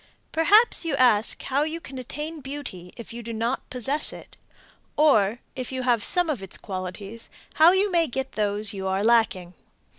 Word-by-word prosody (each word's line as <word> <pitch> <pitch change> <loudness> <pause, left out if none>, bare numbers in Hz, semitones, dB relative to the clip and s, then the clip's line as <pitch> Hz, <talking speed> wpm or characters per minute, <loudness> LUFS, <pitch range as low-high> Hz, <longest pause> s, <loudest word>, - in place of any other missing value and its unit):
Perhaps 410 +9 +4
you 325 -4 -1
ask 235 -5 +2
how 275 +2 0
you 315 +2 -2
can 265 -5 -9
attain 300 +6 -6
beauty 270 -11 -7
if 235 -1 -9
you 235 - -7
do 230 0 -7
not 230 +3 -3
possess 265 +5 -1
it; - - -12 0.6
or, 230 -8 +4 0.2
if 255 -1 -6
you 260 -1 -3
have 240 -4 +2
some 355 -1 +1
of 285 -10 -2
its 195 - -4
qualities, 195 +3 -7 0.3
how 330 +2 +9
you 385 +2 +2
may 335 -2 +2
get 265 +2 -4
those 210 0 +1
you 190 -1 -4
are 190 +1 0
lacking. 220 -6 +2
250 Hz, 180 wpm, -24 LUFS, 210-300 Hz, 0.6 s, how